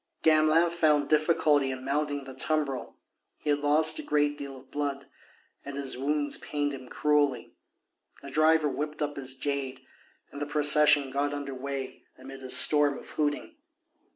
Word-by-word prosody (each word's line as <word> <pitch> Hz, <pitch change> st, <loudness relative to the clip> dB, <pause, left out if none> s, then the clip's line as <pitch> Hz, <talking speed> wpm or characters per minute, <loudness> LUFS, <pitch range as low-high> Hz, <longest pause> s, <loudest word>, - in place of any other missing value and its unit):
Gamelin 160 Hz, +2 st, +3 dB
found 150 Hz, -4 st, +1 dB
difficulty 155 Hz, -3 st, +2 dB
in 130 Hz, 0 st, -6 dB
mounting 145 Hz, 0 st, -2 dB
the 135 Hz, 0 st, -10 dB
tumbril; 140 Hz, -1 st, -2 dB, 0.4 s
he 150 Hz, -, -2 dB
had 145 Hz, -, 0 dB
lost 155 Hz, +2 st, +3 dB
a -, -, -3 dB
great 145 Hz, 0 st, 0 dB
deal 140 Hz, -2 st, -9 dB
of 130 Hz, 0 st, -18 dB
blood 140 Hz, -1 st, -4 dB, 0.6 s
and 140 Hz, 0 st, -8 dB
his 140 Hz, -2 st, -2 dB
wounds 145 Hz, +2 st, 0 dB
pained 145 Hz, -1 st, -3 dB
him 130 Hz, -2 st, -10 dB
cruelly. 145 Hz, -4 st, 0 dB, 0.7 s
The 140 Hz, -, -9 dB
driver 155 Hz, +1 st, +3 dB
whipped 150 Hz, +1 st, -4 dB
up 145 Hz, 0 st, -4 dB
his 130 Hz, -1 st, -3 dB
jade 135 Hz, -1 st, -4 dB, 0.5 s
and 145 Hz, -, -9 dB
the 145 Hz, -, -3 dB
procession 150 Hz, -1 st, +5 dB
got 145 Hz, +1 st, -2 dB
under 140 Hz, -1 st, -6 dB
way 135 Hz, 0 st, -6 dB, 0.2 s
amid 135 Hz, +1 st, -11 dB
a 130 Hz, -, -9 dB
storm 145 Hz, +1 st, +5 dB
of -, -, -12 dB
hooting. 150 Hz, -, -3 dB
145 Hz, 160 wpm, -27 LUFS, 135-150 Hz, 0.7 s, procession